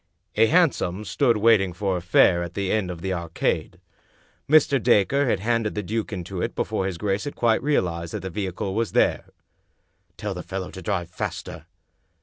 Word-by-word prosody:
A 115 +1 +5
hansom 125 - +2
stood 120 -3 +2
waiting 105 -4 +3
for 95 +1 -1
a 90 - -3
fare 90 0 +4
at 85 0 -6
the 100 -2 -1
end 105 -4 0
of 85 -2 -6
the 95 +1 -2
Arcade. 85 -2 -2 0.7
Mr. 140 -3 +4
Dacre 125 +5 +3
had 100 -5 0
handed 115 -1 0
the 105 - -2
duke 110 +4 -3
into 90 -1 -5
it - - -3
before 95 - -1
his 95 -3 -4
grace 100 +2 -1
had 145 - -5
quite 115 -2 +2
realized 85 - -1
that 105 - -4
the 95 +1 -6
vehicle 95 0 -3
was 115 +1 -1
there. - - +2 0.9
"Tell 105 -2 -4
the 90 - -6
fellow 95 +1 -5
to 95 - -9
drive 85 -2 -2
faster." - - -6
100 Hz, 185 wpm, -24 LUFS, 90-115 Hz, 0.9 s, A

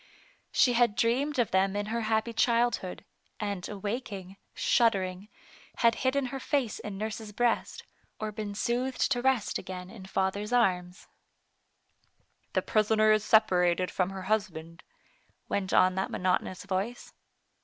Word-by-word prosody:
She 250 - +4
had 235 -3 +3
dreamed 265 +7 +1
of 240 -3 +1
them 190 +1 +2
in 205 0 -1
her 235 - 0
happy 220 +1 0
childhood, 230 -4 +1 0.3
and 200 -4 -3
awaking, 200 -2 -5 0.2
shuddering, 195 -3 +1 0.6
had 230 - +6
hidden 260 +1 +1
her 270 - -3
face 260 -4 -1
in 205 -2 -6
nurse's 215 +1 -5
breast, 235 +3 0 0.4
or 215 0 -3
been 210 -1 -5
soothed 250 +5 0
to 245 -2 +1
rest 255 -5 +1
again 185 0 -7
in 200 -5 -11
father's 195 +3 -1
arms. 180 -6 +1 0.7
" - - -43
The - - +1
prisoner 215 0 +3
is 215 -1 +3
separated 180 -5 +3
from 185 -1 0
her 190 -1 -6
husband," 180 -5 -2 0.7
went 195 -1 -2
on 185 0 +5
that 190 +1 -2
monotonous 185 0 -1
voice. 200 +5 -3
210 Hz, 140 wpm, -29 LUFS, 190-235 Hz, 0.7 s, had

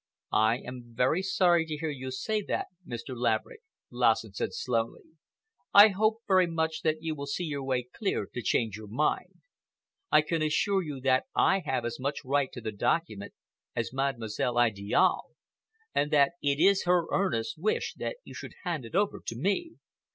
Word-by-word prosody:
"I 110 +2 +4
am 125 -2 -10
very 130 +9 +2
sorry 180 -3 +3
to 155 -1 -3
hear 160 0 -2
you 130 -2 -6
say 210 +12 -1
that, - - -2 0.2
Mr. 120 +2 -6
Laverick," 120 - -1 0.3
Lassen - - +2
said - - -2
slowly. 460 0 -2 0.7
"I 205 +2 +11
hope 215 +3 +1
very 185 -2 +4
much 160 -1 -1
that 155 0 0
you 160 -1 -1
will 140 -2 -6
see 145 +5 -2
your 145 -4 -3
way 130 -2 0
clear 200 - -1
to 125 - -6
change 110 -3 0
your 110 -1 -10
mind. 125 +9 -1 0.7
I 150 - +6
can 165 +1 -1
assure 190 +6 +2
you 145 -6 -6
that 130 0 +2
I 195 - +4
have 125 -3 0
as 120 - -4
much 140 +2 -3
right 140 0 +1
to 125 - -8
the 110 - -3
document 105 -1 -1 0.4
as - - -2
Mademoiselle 120 -3 -1
Idiale, 105 -4 +2 0.6
and 145 - +1
that 140 -2 +4
it 140 0 +1
is 195 +3 +4
her 175 -1 +3
earnest 150 -6 0
wish 215 +6 0
that - - -3
you - - -11
should - - -8
hand 165 -9 -3
it 115 - -9
over 200 +1 +1
to 115 - -5
me. 200 - -1
145 Hz, 180 wpm, -29 LUFS, 125-180 Hz, 0.7 s, I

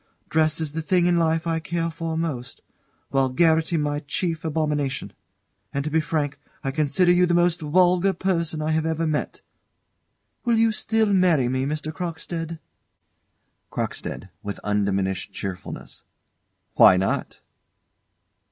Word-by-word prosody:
Dress 155 0 +2
is 155 -3 -2
the 160 +2 -3
thing 175 +2 +2
in 175 -1 +3
life 165 0 +1
I 165 -1 0
care 165 +1 -2
for 165 0 -4
most, 135 -7 -4 0.5
vulgarity 160 +5 +2
my 145 -1 0
chief 165 +2 -2
abomination. 150 -8 -1 0.6
And 140 - -2
to 155 - -3
be 160 +1 +3
frank, 150 -3 -2 0.2
I 135 - -1
consider 155 +5 +3
you 180 0 +4
the 175 - +2
most 175 -1 +2
vulgar 180 +4 +3
person 170 -4 -1
I 155 - 0
have 160 0 +1
ever 160 0 0
met. 155 -2 -2 1.0
Will 235 -2 +2
you 225 0 +4
still 220 -1 +1
marry 175 -9 +4
me, 130 +1 0
Mr. 155 +1 -3
Crockstead? 165 -1 -4 1.1
CROCKSTEAD. - - -4
[With 100 0 -5
undiminished 100 -2 -1
cheerfulness.] 95 -3 -7 0.7
Why 90 - +7
not? 95 +1 -2
160 Hz, 135 wpm, -24 LUFS, 145-170 Hz, 1.1 s, Why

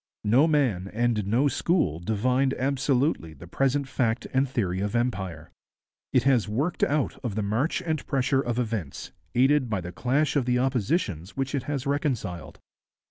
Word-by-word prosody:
No 125 +9 +4
man 125 - +1
and 110 -2 0
no 120 +7 +3
school 145 - +1
divined 125 +8 +1
absolutely 135 - 0
the 75 - -12
present 135 +8 0
fact 120 -3 0
and 135 +1 +2
theory 95 -8 -1
of 105 +3 -2
empire. 95 -10 -2 0.6
It 125 - +3
has 125 -6 +3
worked 140 +11 -1
out 145 -1 0
of 115 -6 -3
the 110 - -1
march 135 - 0
and 160 -3 -2
pressure 135 -1 +1
of 120 -3 -2
events, 110 - -3 0.2
aided 135 +1 +3
by 105 -3 0
the 90 0 -6
clash 140 +10 0
of 140 -4 +2
the 125 0 +2
oppositions 125 - -1
which 135 0 -2
it 140 - -2
has 140 -4 -2
reconciled. 130 - -2
125 Hz, 165 wpm, -26 LUFS, 105-140 Hz, 0.6 s, No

